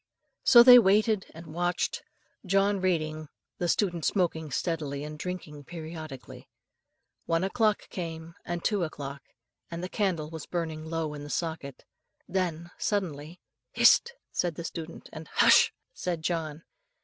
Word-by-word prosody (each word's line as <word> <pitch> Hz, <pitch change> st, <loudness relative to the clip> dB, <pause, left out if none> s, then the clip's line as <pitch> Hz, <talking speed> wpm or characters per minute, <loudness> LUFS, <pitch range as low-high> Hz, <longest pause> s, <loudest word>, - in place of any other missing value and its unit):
So 235 Hz, -1 st, +9 dB
they 245 Hz, 0 st, +11 dB
waited 210 Hz, 0 st, +3 dB
and 165 Hz, +2 st, -11 dB
watched, 175 Hz, +1 st, -1 dB, 0.4 s
John 195 Hz, +1 st, +2 dB
reading, 155 Hz, -4 st, -1 dB, 0.3 s
the 175 Hz, -, 0 dB
student 175 Hz, -3 st, 0 dB
smoking 160 Hz, -4 st, 0 dB
steadily 145 Hz, -1 st, -2 dB
and 150 Hz, 0 st, -6 dB
drinking 150 Hz, -3 st, -6 dB
periodically. 155 Hz, -5 st, -9 dB, 0.8 s
One 165 Hz, +1 st, +1 dB
o'clock 215 Hz, +2 st, +1 dB
came, 165 Hz, -2 st, -6 dB
and 175 Hz, -1 st, -4 dB
two 205 Hz, -4 st, +1 dB
o'clock, 140 Hz, -3 st, -6 dB, 0.5 s
and 170 Hz, +1 st, -6 dB
the -, -, -2 dB
candle 180 Hz, -8 st, -1 dB
was 160 Hz, -2 st, -7 dB
burning 160 Hz, -3 st, -3 dB
low 165 Hz, -2 st, -2 dB
in 145 Hz, -1 st, -7 dB
the 145 Hz, -, -8 dB
socket, 160 Hz, -5 st, -4 dB, 0.4 s
when 175 Hz, -2 st, -2 dB
suddenly, 175 Hz, -4 st, -2 dB, 0.3 s
"Hist!" 475 Hz, -, +5 dB, 0.2 s
said 175 Hz, -3 st, -1 dB
the 170 Hz, -, -6 dB
student, 165 Hz, 0 st, -7 dB
and 155 Hz, 0 st, -8 dB
"Hush!" -, -, +5 dB, 0.2 s
said 175 Hz, -, -3 dB
John. 160 Hz, -2 st, -2 dB
165 Hz, 135 wpm, -28 LUFS, 155-185 Hz, 0.8 s, they